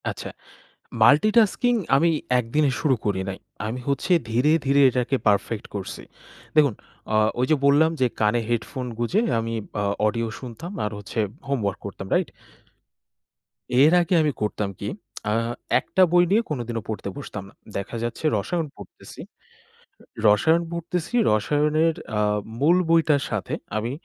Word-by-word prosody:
আচ্ছা। -, -, -6 dB, 0.7 s
মাল্টিটাস্কিং 215 Hz, -, +4 dB, 0.2 s
আমি 165 Hz, +4 st, +3 dB, 0.3 s
একদিনে 135 Hz, +5 st, +1 dB
শুরু 140 Hz, -4 st, +3 dB
করি 100 Hz, -2 st, 0 dB
নাই। 95 Hz, -, -5 dB, 0.3 s
আমি 120 Hz, +4 st, -4 dB
হচ্ছে 140 Hz, +6 st, 0 dB, 0.2 s
ধীরে, 125 Hz, +7 st, +3 dB
ধীরে, 140 Hz, +1 st, +4 dB
এটাকে 125 Hz, +2 st, 0 dB
পারফেক্ট 105 Hz, +1 st, +1 dB
করছি। 100 Hz, -2 st, -6 dB, 0.5 s
দেখুন 145 Hz, -7 st, +5 dB, 0.4 s
অ -, -, +4 dB, 0.2 s
ওই 125 Hz, -, +2 dB
যে, -, -, +6 dB
বললাম 145 Hz, +3 st, +5 dB
যে, 130 Hz, -, +4 dB
কানে 110 Hz, +2 st, +2 dB
হেডফোন 120 Hz, +2 st, -2 dB
গুঁজে 120 Hz, -, +1 dB, 0.2 s
আমি 115 Hz, 0 st, -3 dB, 0.3 s
অ -, -, 0 dB, 0.2 s
অডিও 115 Hz, +1 st, 0 dB
শুনতাম 130 Hz, -, -8 dB
আর 105 Hz, -, -1 dB
হচ্ছে 105 Hz, +3 st, -8 dB, 0.3 s
হোম 140 Hz, 0 st, 0 dB
ওয়ার্ক 100 Hz, -1 st, -2 dB
করতাম। 95 Hz, -1 st, -7 dB
রাইট? -, -, +1 dB, 1.5 s
এর 150 Hz, +3 st, +6 dB
আগে 175 Hz, +1 st, -1 dB
আমি 150 Hz, -1 st, +2 dB
করতাম 105 Hz, -1 st, -1 dB
কি -, -, -4 dB, 0.4 s
আ -, -, +1 dB, 0.5 s
একটা 190 Hz, -, -1 dB
বই 175 Hz, 0 st, +6 dB
নিয়ে 215 Hz, +3 st, +4 dB
কোনদিনও 120 Hz, -5 st, -3 dB
পড়তে 105 Hz, -3 st, -4 dB
বসতাম 105 Hz, -8 st, -7 dB
না। -, -, -20 dB, 0.2 s
দেখা 100 Hz, +4 st, -5 dB
যাচ্ছে 120 Hz, +6 st, -4 dB
রসায়ন 165 Hz, -, -2 dB
পড়তেছি। -, -, -13 dB, 1.1 s
'রসায়ন' 160 Hz, +12 st, +4 dB
পড়তেছি 170 Hz, +3 st, -4 dB, 0.2 s
রসায়নের 150 Hz, +8 st, +2 dB, 0.2 s
এ্যাঁ 105 Hz, -1 st, +1 dB, 0.2 s
মূল 165 Hz, +6 st, +4 dB
বইটার 160 Hz, -4 st, +3 dB
সাথে -, -, -3 dB, 0.2 s
আমি 115 Hz, +3 st, -2 dB
130 Hz, 145 wpm, -24 LUFS, 110-155 Hz, 1.5 s, যে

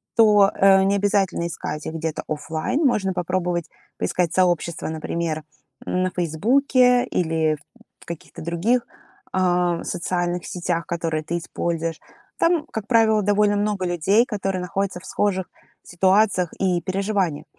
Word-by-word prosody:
то, 210 Hz, -3 st, +6 dB
э, 195 Hz, 0 st, +5 dB
необязательно 195 Hz, -3 st, +1 dB
искать 155 Hz, -2 st, -5 dB
их -, -, -4 dB
где-то 160 Hz, -1 st, -3 dB
офлайн. 160 Hz, -, -2 dB
Можно 200 Hz, -7 st, +1 dB
попробовать 180 Hz, -1 st, -2 dB, 0.3 s
поискать 175 Hz, -2 st, -1 dB
сообщества, 175 Hz, -2 st, +1 dB
например, 160 Hz, 0 st, -3 dB, 0.4 s
на 185 Hz, 0 st, 0 dB
"Фейсбуке" 245 Hz, -, +3 dB
или 160 Hz, -2 st, 0 dB
в -, -, -16 dB, 0.4 s
в -, -, -16 dB
каких-то 170 Hz, -2 st, -8 dB
других, 185 Hz, +10 st, 0 dB, 0.5 s
а, 180 Hz, -2 st, +1 dB
социальных 175 Hz, 0 st, -2 dB
сетях, 175 Hz, -1 st, -2 dB
которые 165 Hz, -2 st, -2 dB
ты 170 Hz, +3 st, -3 dB
используешь. 165 Hz, -1 st, -3 dB, 0.4 s
Там, 335 Hz, -2 st, +2 dB
как 220 Hz, -1 st, -5 dB
правило, 225 Hz, -2 st, +4 dB
довольно 205 Hz, +1 st, +2 dB
много 205 Hz, -2 st, -1 dB
людей, 180 Hz, +6 st, +2 dB
которые 195 Hz, -5 st, -2 dB
находятся 190 Hz, +1 st, -2 dB
в -, -, -14 dB
схожих 190 Hz, -1 st, 0 dB, 0.4 s
ситуациях 190 Hz, 0 st, +2 dB
и 180 Hz, -2 st, +1 dB
переживаниях. 190 Hz, -3 st, -1 dB
185 Hz, 130 wpm, -22 LUFS, 170-205 Hz, 0.5 s, то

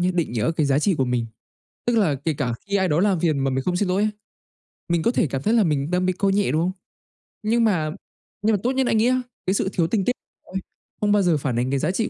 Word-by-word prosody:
nhá 180 Hz, +1 st, +2 dB
định 165 Hz, -8 st, 0 dB
nghĩa 115 Hz, +6 st, 0 dB
cái 150 Hz, -, +2 dB
giá 140 Hz, 0 st, +3 dB
trị 185 Hz, +4 st, +2 dB
của 130 Hz, -, +3 dB
mình. 125 Hz, -2 st, -1 dB, 0.6 s
Tức 240 Hz, -1 st, +2 dB
là 165 Hz, -10 st, +3 dB
kể 155 Hz, +4 st, -2 dB
cả 125 Hz, -5 st, -2 dB
khi 200 Hz, -, -2 dB
ai 190 Hz, -1 st, +2 dB
đó 150 Hz, 0 st, +2 dB
làm 190 Hz, -3 st, +2 dB
phiền 155 Hz, -5 st, +1 dB
mà 135 Hz, -, +1 dB
mình 130 Hz, 0 st, -1 dB
không 180 Hz, -, 0 dB
xin 185 Hz, 0 st, 0 dB
lỗi 190 Hz, +2 st, +1 dB
ấy, 215 Hz, 0 st, +1 dB, 0.8 s
mình 170 Hz, -1 st, +1 dB
có 235 Hz, -, +3 dB
thể 185 Hz, -, +1 dB
cảm 135 Hz, 0 st, -3 dB
thấy 215 Hz, +10 st, +1 dB
là 225 Hz, -3 st, +5 dB
mình 150 Hz, -2 st, 0 dB
đang 180 Hz, 0 st, +1 dB
bị 185 Hz, -, +1 dB
coi 195 Hz, +1 st, +1 dB
nhẹ, 200 Hz, 0 st, +1 dB
đúng 155 Hz, +2 st, +1 dB
không? 180 Hz, +2 st, +1 dB, 0.7 s
Nhưng 230 Hz, +2 st, +2 dB
mà 165 Hz, -8 st, +1 dB, 0.5 s
nhưng 220 Hz, +1 st, +3 dB
mà 205 Hz, -, +1 dB
tốt 250 Hz, -, +2 dB
nhất 265 Hz, -1 st, +1 dB
anh 225 Hz, -, +2 dB
nghĩ 220 Hz, +2 st, +3 dB
á, 255 Hz, 0 st, +2 dB, 0.3 s
cái 190 Hz, -, +3 dB
sự 190 Hz, -, 0 dB
thiếu 165 Hz, -2 st, +1 dB
tinh 195 Hz, 0 st, 0 dB
tế 250 Hz, -, +2 dB, 0.3 s
ôi, 190 Hz, -, -6 dB, 0.4 s
không 205 Hz, -, +2 dB
bao 205 Hz, 0 st, +4 dB
giờ 175 Hz, -4 st, +3 dB
phản 135 Hz, -4 st, -2 dB
ánh 125 Hz, +2 st, 0 dB
cái 140 Hz, -, +1 dB
giá 155 Hz, +5 st, 0 dB
trị 220 Hz, +4 st, -1 dB
180 Hz, 295 wpm, -23 LUFS, 150-205 Hz, 0.8 s, là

